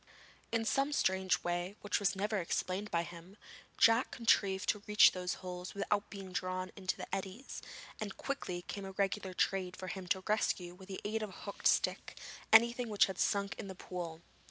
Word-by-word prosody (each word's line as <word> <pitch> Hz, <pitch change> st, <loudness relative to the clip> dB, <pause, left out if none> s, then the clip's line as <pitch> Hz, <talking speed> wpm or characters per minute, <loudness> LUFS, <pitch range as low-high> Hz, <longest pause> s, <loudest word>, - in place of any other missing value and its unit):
In 230 Hz, -1 st, +1 dB
some 275 Hz, +5 st, +2 dB
strange 190 Hz, -6 st, +2 dB
way 175 Hz, +3 st, -1 dB
which 205 Hz, -, 0 dB
was 200 Hz, -1 st, +2 dB
never 205 Hz, +2 st, 0 dB
explained 185 Hz, +3 st, -1 dB
by 170 Hz, 0 st, +1 dB
him, 175 Hz, +3 st, -11 dB, 0.4 s
Jack 230 Hz, +3 st, +5 dB
contrived 200 Hz, -4 st, +2 dB
to 210 Hz, -, +1 dB
reach 210 Hz, 0 st, +8 dB
these 180 Hz, -1 st, -2 dB
holes 180 Hz, 0 st, -7 dB
without 200 Hz, +1 st, 0 dB
being 195 Hz, -2 st, -8 dB
drawn 185 Hz, 0 st, -2 dB
into 185 Hz, -2 st, -2 dB
the -, -, -5 dB
eddies, 195 Hz, +7 st, -6 dB, 0.4 s
and 215 Hz, -, -3 dB
it -, -, -10 dB
quickly 185 Hz, -11 st, -3 dB
became 200 Hz, -1 st, -5 dB
a 190 Hz, -, -7 dB
regular 195 Hz, -1 st, -1 dB
trade 185 Hz, -1 st, 0 dB
with 185 Hz, -, -4 dB
him 190 Hz, -3 st, -6 dB
to 190 Hz, +1 st, 0 dB
rescue 190 Hz, -4 st, +1 dB
with 185 Hz, +1 st, -13 dB
the 190 Hz, -1 st, -6 dB
aid 220 Hz, +1 st, -1 dB
of 215 Hz, -, -3 dB
a -, -, -12 dB
hooked -, -, -1 dB
stick -, -, +1 dB, 0.3 s
anything 235 Hz, +1 st, +6 dB
which 210 Hz, -2 st, +5 dB
had 190 Hz, -1 st, -6 dB
sunk 200 Hz, -1 st, +1 dB
in -, -, -5 dB
the 190 Hz, -, -7 dB
pool. 175 Hz, -3 st, -6 dB
195 Hz, 195 wpm, -34 LUFS, 185-210 Hz, 0.4 s, reach